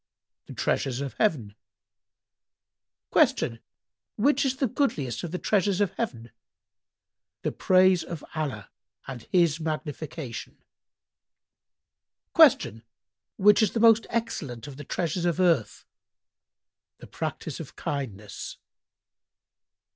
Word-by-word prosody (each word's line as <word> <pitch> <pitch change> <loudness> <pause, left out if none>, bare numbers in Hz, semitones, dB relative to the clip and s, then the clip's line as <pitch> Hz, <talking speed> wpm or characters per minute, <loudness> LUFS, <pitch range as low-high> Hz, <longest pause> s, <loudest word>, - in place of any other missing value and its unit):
"—"The - - -9
treasures 130 -2 -1
of 140 -1 -4
heaven." 140 - +1 1.6
Q 115 -1 +3 0.6
"Which 280 +8 +2
is 265 -1 +1
the 270 - 0
goodliest 155 - -1
of 175 - -3
the 180 - -3
treasures 200 0 +1
of 200 -3 +2
Heaven?"—"The 120 - -9
praise 185 -2 +4
of 165 -2 -7
Allah 135 -11 -4 0.3
and 130 -3 -7
His 170 -4 +3
magnification." 155 -4 -5 1.8
Q 110 +2 +5 0.6
"Which 210 +2 +6
is 215 - +2
the 230 - 0
most 225 -1 +5
excellent 155 - -3
of 140 -2 -9
the 145 - -7
treasures 170 +4 -2
of 175 0 0
earth?"—"The 170 - -4
practice - - -5
of - - -9
kindness." 110 -8 -5
160 Hz, 100 wpm, -27 LUFS, 130-200 Hz, 1.8 s, Which